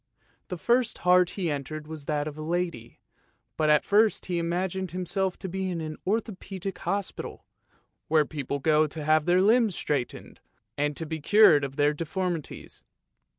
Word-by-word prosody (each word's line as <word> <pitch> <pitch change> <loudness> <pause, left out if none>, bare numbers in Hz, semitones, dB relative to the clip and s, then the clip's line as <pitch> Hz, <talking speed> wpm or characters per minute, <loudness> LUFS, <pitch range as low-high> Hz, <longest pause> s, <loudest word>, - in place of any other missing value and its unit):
The 180 - -5
first 240 +5 +1
heart 180 0 +5
he 175 -5 0
entered 145 +2 -5
was 155 -2 -8
that 150 -1 -1
of 150 - -6
a 155 - -8
lady, 165 -8 -3 0.6
but 155 -1 +1
at 150 0 +5
first 210 +1 +3
he 175 -2 -1
imagined 180 +2 -2
him 180 +2 -4
self 190 0 -1
to - - -6
be 190 +1 -3
in 175 -2 -3
an 155 -1 -5
Orthopaedic 195 -3 -3
Hospital, 200 -1 -4 0.6
where 155 -1 +3
people 140 -2 -4
go 155 +2 +3
to 150 +1 -7
have 155 0 +3
their 180 +1 +4
limbs 220 -2 +4
straightened, 140 -5 -3 0.4
and 145 0 -1
to 165 - -4
be 160 0 -5
cured 165 -4 +6
of 135 -1 -4
their 145 +1 +3
deformities. 165 +1 -4
170 Hz, 170 wpm, -27 LUFS, 150-190 Hz, 0.6 s, cured